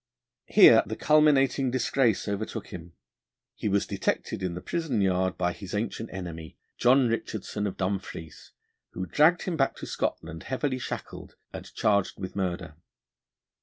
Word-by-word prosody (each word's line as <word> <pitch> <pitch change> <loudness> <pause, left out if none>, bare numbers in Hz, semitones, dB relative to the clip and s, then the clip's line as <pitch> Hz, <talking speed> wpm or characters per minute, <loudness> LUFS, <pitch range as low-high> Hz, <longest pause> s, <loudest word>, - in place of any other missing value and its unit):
Here - - +8
the - - -5
culminating 140 -3 +3
disgrace 125 -3 +1
overtook 105 +1 -4
him: 85 0 -9 0.6
he 105 - -3
was 100 0 +1
detected - - -2
in 90 -2 -2
the - - -4
prison 160 -9 -2
yard 95 -1 +1
by 90 -1 0
his 95 0 -7
ancient 110 +1 -3
enemy, 85 -4 -7 0.2
John 125 +1 +5
Richardson, 110 -2 -3
of 95 - -6
Dumfries, 95 -4 -5 0.4
who 95 - -4
dragged 155 - +3
him 180 - -2
back 135 - +1
to - - -8
Scotland 80 -1 -3
heavily 130 0 -2
shackled 120 - -7 0.2
and - - -8
charged 100 -2 +1
with 95 -1 -6
murder. 90 -5 -3
100 Hz, 145 wpm, -27 LUFS, 90-130 Hz, 0.6 s, Here